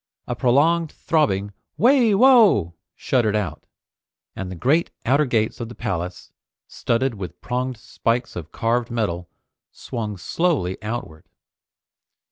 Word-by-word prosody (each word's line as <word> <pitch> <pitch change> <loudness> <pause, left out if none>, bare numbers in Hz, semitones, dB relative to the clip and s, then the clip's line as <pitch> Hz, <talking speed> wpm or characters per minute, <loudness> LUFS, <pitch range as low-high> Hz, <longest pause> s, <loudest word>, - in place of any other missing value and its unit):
A - - -3
prolonged 155 +6 +2
throbbing 100 -11 0 0.2
"Wai! 240 -3 +4
Wo!" 210 - +5 0.2
shuddered 110 -5 +1
out, 105 -3 -3 0.7
and 95 -1 -5
the 90 - -6
great 145 - +2 0.2
outer 140 +5 +3
gates 110 -4 0
of 115 -1 -5
the 120 - -10
palace, 90 -5 -4 0.4
studded 125 +2 -1
with 95 -5 -8
pronged 125 0 -3
spikes 115 +3 -2
of 85 -2 -7
carved 115 +1 0
metal, 95 -7 -2 0.4
swung 105 -4 -5
slowly 115 - -1
outward. 105 -8 -6
115 Hz, 120 wpm, -22 LUFS, 100-145 Hz, 0.7 s, Wo